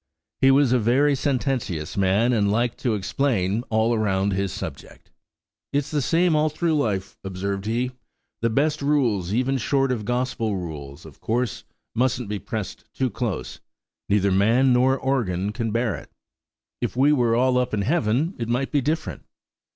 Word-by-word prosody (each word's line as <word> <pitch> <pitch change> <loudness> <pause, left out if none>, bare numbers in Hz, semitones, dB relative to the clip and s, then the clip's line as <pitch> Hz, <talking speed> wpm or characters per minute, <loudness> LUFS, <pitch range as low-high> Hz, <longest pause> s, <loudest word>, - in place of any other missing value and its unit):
He 135 - +5
was 135 -1 +4
a 125 - +4
very 130 +6 +3
sententious 130 - -1
man 100 +5 +2
and 100 -3 +2
liked 115 +2 0
to 120 -4 0
explain 105 -1 0
all 110 +1 +2
round 100 -2 +1
his 95 0 -1
subject. - - -8 0.6
"It's 145 0 -1
the 150 -2 +1
same 165 +4 +2
all 155 +1 +3
through 160 +2 0
life," 105 -9 -2
observed 95 +1 -4
he; 120 +3 0 0.5
"the 115 - +2
best 150 +6 +1
rules, 120 -11 +1
even, 130 +4 +1
short 135 +2 +1
of 115 -4 -2
Gospel 120 -2 -1
rules, 75 -4 -7
of 75 -4 -14
course, 120 0 -2 0.3
mustn't 125 -2 0
be 105 -1 -2
pressed 110 +1 -5
too 130 -2 0
close; 100 - -4 0.5
neither 100 -1 +3
man 115 +7 +4
nor 130 +2 +3
organ 105 -9 -1
can 115 0 -3
bear 115 -1 0
it. - - -9 0.7
If - - -2
we 140 +3 +5
were 120 -5 +2
all 125 +1 +3
up 125 - -1
in 105 -2 0
heaven 135 - +1
it 115 -1 -3
might 125 +3 0
be 145 - +2
different." 155 +5 -2
120 Hz, 165 wpm, -24 LUFS, 100-135 Hz, 0.7 s, He